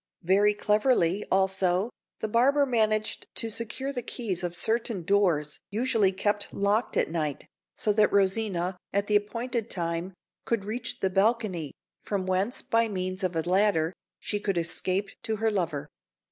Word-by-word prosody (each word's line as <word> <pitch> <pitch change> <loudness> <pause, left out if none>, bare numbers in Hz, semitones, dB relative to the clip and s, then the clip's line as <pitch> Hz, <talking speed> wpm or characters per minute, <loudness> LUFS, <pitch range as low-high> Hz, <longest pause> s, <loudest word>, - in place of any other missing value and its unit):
Very 200 +4 +4
cleverly, 210 -3 +2
also, 190 +2 +2 0.3
the - - 0
barber 270 +6 +4
managed 215 -4 0
to 225 - -1
secure 230 +5 -3
the 250 - -2
keys 215 -7 -3
of 175 -1 -2
certain 220 -1 0
doors 165 -6 +1
usually 215 -2 +2
kept 205 +2 -1
locked 205 +4 0
at - - +1
night, 155 -4 -2 0.3
so 210 - +1
that 210 0 +4
Rosina, 190 -2 +1
at 200 +1 +1
the 210 - +1
appointed 230 +3 -1
time, 170 +1 -3 0.3
could 230 -4 -1
reach 230 +3 -2
the 190 - +1
balcony, 195 - +1 0.3
from 195 -3 -2
whence, 185 +6 0
by 230 0 +2
means 185 -1 -3
of 180 -2 -1
a 160 - 0
ladder, 185 -3 +2 0.3
she 205 - -2
could 200 -3 -1
escape 185 +4 -1
to 220 - -2
her 220 +1 +1
lover. 165 -7 -2
200 Hz, 155 wpm, -27 LUFS, 185-220 Hz, 0.3 s, Very